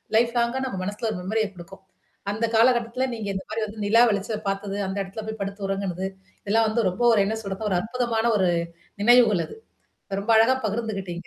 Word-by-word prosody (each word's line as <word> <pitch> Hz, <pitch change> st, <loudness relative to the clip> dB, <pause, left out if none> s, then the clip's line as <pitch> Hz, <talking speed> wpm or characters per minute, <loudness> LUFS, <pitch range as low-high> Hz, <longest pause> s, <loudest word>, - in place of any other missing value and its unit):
Life 235 Hz, +1 st, +3 dB
லாங்க 235 Hz, +2 st, +1 dB
நம்ம 190 Hz, -6 st, -4 dB
மனசுல 210 Hz, +4 st, -3 dB
ஒரு 180 Hz, -, -4 dB
மெமரிய 215 Hz, +3 st, 0 dB
குடுக்கும். 185 Hz, +2 st, -12 dB, 0.5 s
அந்த 220 Hz, +3 st, -1 dB
காலகட்டத்தில 240 Hz, +2 st, +3 dB
நீங்க 215 Hz, -2 st, -5 dB
இந்த 190 Hz, 0 st, -4 dB
மாரி 220 Hz, +1 st, -3 dB
வந்து 210 Hz, 0 st, -7 dB
நிலா 230 Hz, +3 st, +5 dB
வெளிச்ச 205 Hz, +2 st, -2 dB
பார்த்தது, 195 Hz, 0 st, -3 dB
அந்த 190 Hz, +1 st, -4 dB
இடத்துல 195 Hz, +3 st, -7 dB
போய் 220 Hz, -1 st, -5 dB
படுத்து 200 Hz, 0 st, -5 dB
உறங்குனது. 195 Hz, -2 st, -2 dB, 0.4 s
இதெல்லாம் 220 Hz, +2 st, +3 dB
வந்து 225 Hz, -1 st, 0 dB
ரொம்ப 185 Hz, -, -8 dB
ஒரு 210 Hz, -, +4 dB
என்ன 220 Hz, -, -1 dB
சொல்றது, 195 Hz, +2 st, -4 dB
ஒரு -, -, +2 dB
அற்புதமான 235 Hz, 0 st, -1 dB
ஒரு 185 Hz, -2 st, +2 dB, 0.5 s
நினைவுகள் 230 Hz, -6 st, +5 dB
அது. -, -, -11 dB, 0.7 s
ரொம்ப 220 Hz, +3 st, -3 dB
அழகா 240 Hz, +4 st, +5 dB
பகிர்ந்துகிட்டீங்க. 200 Hz, -5 st, -3 dB
215 Hz, 185 wpm, -24 LUFS, 195-230 Hz, 0.7 s, நிலா